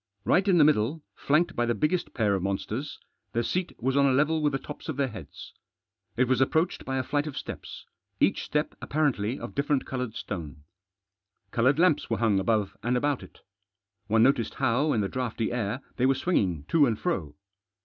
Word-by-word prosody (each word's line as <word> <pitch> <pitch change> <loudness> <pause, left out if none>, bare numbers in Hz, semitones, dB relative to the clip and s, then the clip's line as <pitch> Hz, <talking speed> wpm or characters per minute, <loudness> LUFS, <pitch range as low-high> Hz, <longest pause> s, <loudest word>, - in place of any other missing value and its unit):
Right 195 +2 +3
in 185 -3 +5
the 155 - +7
middle, 145 +1 +2
flanked 155 +5 +1
by 120 0 +1
the 120 - +1
biggest 160 - -1
pair 105 -4 +2
of 95 - 0
monsters, 105 +8 -3 0.4
the 120 - +1
seat 180 +9 -2
was 130 +3 0
on 140 0 +5
a - - +3
level 155 +4 +2
with 150 -1 +2
the - - +1
tops 150 +3 -9
of 150 - -3
their 140 -2 +1
heads. 80 - -10 0.6
It 125 +1 +3
was 130 0 +2
approached 160 +6 +1
by 135 0 -2
a 130 - 0
flight 145 +3 -1
of 150 - -6
steps, - - -7 0.3
each - - +2
step 150 0 -1
apparently 135 -6 0
of - - -7
different 140 -1 0
coloured 125 -4 -4
stone. 80 -6 -6 0.9
Coloured 130 +4 +3
lamps 165 -3 +3
were 115 - 0
hung 110 -4 +2
above 100 -1 0
and 120 +2 +1
about 145 +1 0
it. - - -14 0.7
One 110 +1 +4
noticed 130 -2 +2
how, 135 +7 +1
in 110 - +1
the 100 - 0
draughty 120 -2 -2
air, 120 +1 -2 0.2
they 130 - +3
were 135 - +3
swinging 95 - 0
to 150 -4 +5
and 110 -3 0
fro. 75 -5 -2
130 Hz, 200 wpm, -27 LUFS, 110-150 Hz, 0.9 s, the